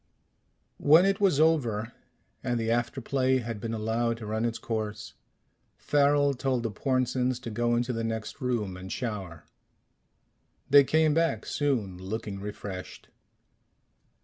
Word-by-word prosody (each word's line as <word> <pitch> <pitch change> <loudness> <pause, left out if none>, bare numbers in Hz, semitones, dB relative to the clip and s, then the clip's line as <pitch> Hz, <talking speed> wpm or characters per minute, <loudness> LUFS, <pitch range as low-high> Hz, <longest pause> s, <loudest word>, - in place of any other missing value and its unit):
When 160 +5 +6
it 195 +1 +1
was 185 -8 +3
over, 120 -9 +2 0.5
and 120 -2 0
the 115 0 0
after 120 +3 -1
play 130 +1 +1
had 115 -3 -4
been 115 - -3
allowed 115 +2 -1
to 115 - -8
run 110 +2 -1
its 115 0 -1
course, 110 -4 -4 0.6
Farrel 145 0 +3
told 130 -2 -1
the 115 - -2
Pornsens 130 +1 0
to 115 - -6
go 120 +2 +1
into 120 +1 0
the 115 0 -2
next 115 +4 -4
room 115 -7 -1
and 95 0 -8
shower. 95 -9 -5 1.2
They 140 0 +8
came 155 +2 +3
back 165 +1 +1
soon, 115 -11 -1
looking 100 +1 -5
refreshed. 100 -2 -7
120 Hz, 140 wpm, -28 LUFS, 110-135 Hz, 1.2 s, They